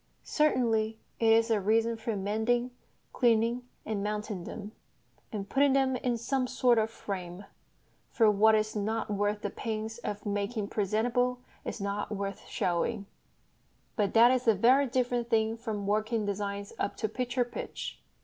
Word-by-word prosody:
Certainly 225 -7 +1 0.2
it 230 - +2
is 225 +1 +4
a 215 -2 +2
reason 225 +3 +2
for 225 0 -3
mending, 220 +5 0 0.4
cleaning, 235 0 +2 0.2
and 210 -2 -2
mounting 210 -3 -3
them, 210 -1 -7 0.6
and 200 -2 -4
putting 275 +4 +3
them 265 -1 +2
in 245 -1 -1
some 255 +2 -1
sort 250 -2 +3
of 220 0 +1
frame 190 -3 -6 0.6
(for 220 -3 +4
what 220 +2 +5
is 215 0 0
not 215 +1 -1
worth 205 +1 0
the - - -3
pains 220 0 -4
of 210 -3 -5
making 205 +1 -2
presentable 235 +5 +1 0.3
is - - -5
not 200 +1 -3
worth 200 -1 -4
showing), 190 +4 -1 0.9
but 205 -1 0
that 235 +2 +8
is 255 -1 0
a 225 - +6
very 255 +7 +4
different 245 -1 0
thing 220 -1 +2
from 220 -3 -4
working 215 +2 0
designs 200 0 -3
up - - -2
to 215 - -1
picture 245 +2 -1
pitch. 240 - -6
220 Hz, 155 wpm, -30 LUFS, 205-240 Hz, 0.9 s, that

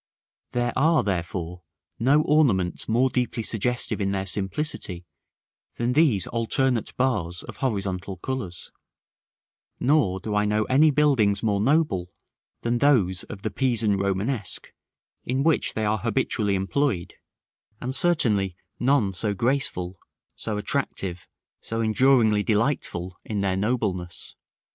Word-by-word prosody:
There 120 -1 0
are, 160 +4 +3
therefore, 90 -2 -3 0.4
no 140 +6 +4
ornaments 115 - +2
more 125 +3 +3
deeply 125 -2 -1
suggestive 120 +1 -1
in 100 0 0
their 95 -1 -2
simplicity 95 - -2 0.7
than 120 +1 0
these 130 - +3
alternate 120 +1 0
bars 105 -10 0
of - - -10
horizontal 95 -6 -2
colors; 95 -5 -5 1.1
nor 125 -9 +2
do 105 +3 -4
I 105 0 +2
know 105 +1 +1
any 140 +7 +4
buildings 135 -9 +2
more 100 -2 +1
noble 125 - +1 0.5
than 120 0 0
those 105 -11 +3
of 100 -1 -9
the 110 - -2
Pisan 115 -3 +1
Romanesque, 100 +3 -2 0.5
in 130 +2 -1
which 160 -1 +1
they 110 - 0
are 105 +1 +1
habitually 105 -1 0
employed; 95 0 -1 0.7
and 130 +2 -3
certainly 110 - +2 0.2
none 120 -6 +2
so 100 +3 -1
graceful, 95 -7 -1 0.3
so 110 -2 -4
attractive, 90 -3 -3 0.3
so 115 - -5
enduringly 110 -1 +4
delightful 105 -6 -1
in 105 -2 -3
their 95 -1 0
nobleness. 95 -5 -2
110 Hz, 125 wpm, -25 LUFS, 95-130 Hz, 1.1 s, no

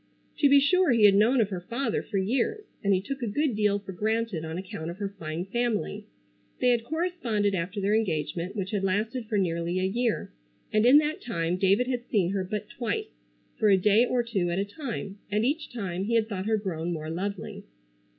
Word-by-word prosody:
To 285 - +5
be 280 0 +7
sure 365 +6 +3
he 230 -4 +4
had 205 -1 +8
known 230 +5 +4
of 210 - +1
her 185 -3 -4
father 235 +8 -2
for 205 - -4
years, 245 - 0 0.2
and 200 - +2
he 190 - +4
took 270 +3 -5
a 235 - -1
good 270 +3 0
deal 210 -1 +2
for 200 -1 -8
granted 215 -2 -1
on 160 +1 -5
account 180 -3 -6
of 170 - -7
her 200 -1 -3
fine 160 +2 -4
family. 215 -1 -2 0.5
They 250 - +3
had 240 -2 +2
corresponded 260 - -1
after 185 +3 -2
their 200 +1 +1
engagement 170 -4 -1
which 195 -2 -3
had 205 -3 -1
lasted 215 +5 -1
for 215 -2 0
nearly 170 -1 0
a - - -1
year, 225 - -1 0.4
and 215 +2 +4
in 265 +4 +8
that 305 +5 +1
time 170 -6 -1
David 195 +6 +3
had 245 -1 -3
seen 190 -5 +1
her 195 -1 -1
but 210 +2 -4
twice, 225 - -3 0.5
for 215 - +4
a 195 - +6
day 210 +4 +4
or 245 0 +1
two 200 -7 -1
at 170 - -1
a 195 - 0
time, 205 -4 -6
and 210 +2 +1
each 300 +4 -1
time 190 -6 -3
he 230 +2 0
had 225 -1 +3
thought 200 -2 -4
her 220 0 +2
grown 175 -5 -3
more 155 -1 -4
lovely. 195 +2 -4
210 Hz, 220 wpm, -27 LUFS, 185-240 Hz, 0.5 s, had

